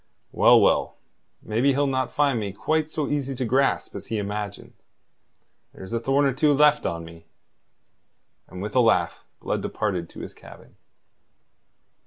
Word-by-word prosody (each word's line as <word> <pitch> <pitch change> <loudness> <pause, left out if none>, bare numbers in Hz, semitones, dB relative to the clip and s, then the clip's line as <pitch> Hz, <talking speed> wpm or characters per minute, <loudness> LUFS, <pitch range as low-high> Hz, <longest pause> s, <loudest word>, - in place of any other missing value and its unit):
"Well, - - +6
well, - - +2 0.5
maybe 120 +6 +1
he'll 145 +2 +1
not 130 -2 -1
find 140 -5 +1
me 100 -3 -4
quite 155 +9 -1
so 155 -2 -3
easy 140 -2 -2
to 125 - -2
grasp 135 +4 +1
as - - -7
he 110 - -2
imagines. 105 0 -6 0.9
There's 95 +4 -9
a 115 - 0
thorn 135 +4 +1
or 135 - +2
two 145 +2 +3
left 150 +1 +4
on 85 0 -4
me." 85 0 -14 1.2
And 95 +1 -8
with 105 - -6
a - - +5
laugh 90 -8 +2 0.2
Blood - - -2
departed 95 -6 -3
to - - -10
his - - -8
cabin. - - -16
125 Hz, 160 wpm, -24 LUFS, 100-140 Hz, 1.2 s, Well